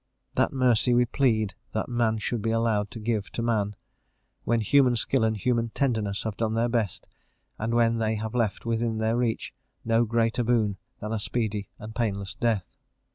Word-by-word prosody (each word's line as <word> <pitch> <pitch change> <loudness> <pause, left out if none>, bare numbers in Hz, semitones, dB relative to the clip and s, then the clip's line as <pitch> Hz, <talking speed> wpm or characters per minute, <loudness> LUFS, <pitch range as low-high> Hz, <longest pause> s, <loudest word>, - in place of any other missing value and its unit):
That - - +2
mercy 125 -2 +3
we 125 0 +5
plead 110 -5 +1 0.2
that 110 - -1
man 120 -2 +1
should 110 +1 -2
be 115 - -1
allowed 110 -2 +1
to 110 - -8
give 110 -2 -1
to 115 - -2
man, 105 -3 0 0.7
when 115 0 +2
human 130 +2 +4
skill 120 +2 +1
and 110 -1 +1
human 115 +1 +1
tenderness 110 -7 0
have 110 -2 -3
done 110 -1 0
their 115 +1 +2
best, 115 -6 -1 0.5
and 115 +2 -1
when 115 -1 +3
they 110 0 +1
have 110 0 -4
left 115 -4 -1
within 115 -1 0
their 110 +1 +1
reach 120 -2 -1 0.3
no 115 +1 +3
greater 115 +1 +1
boon 110 -4 +1 0.2
than 105 +1 -3
a 110 - -1
speedy 105 -2 -2
and 110 +1 -8
painless 100 -4 -2
death. 110 -6 -1
115 Hz, 185 wpm, -27 LUFS, 110-120 Hz, 0.7 s, we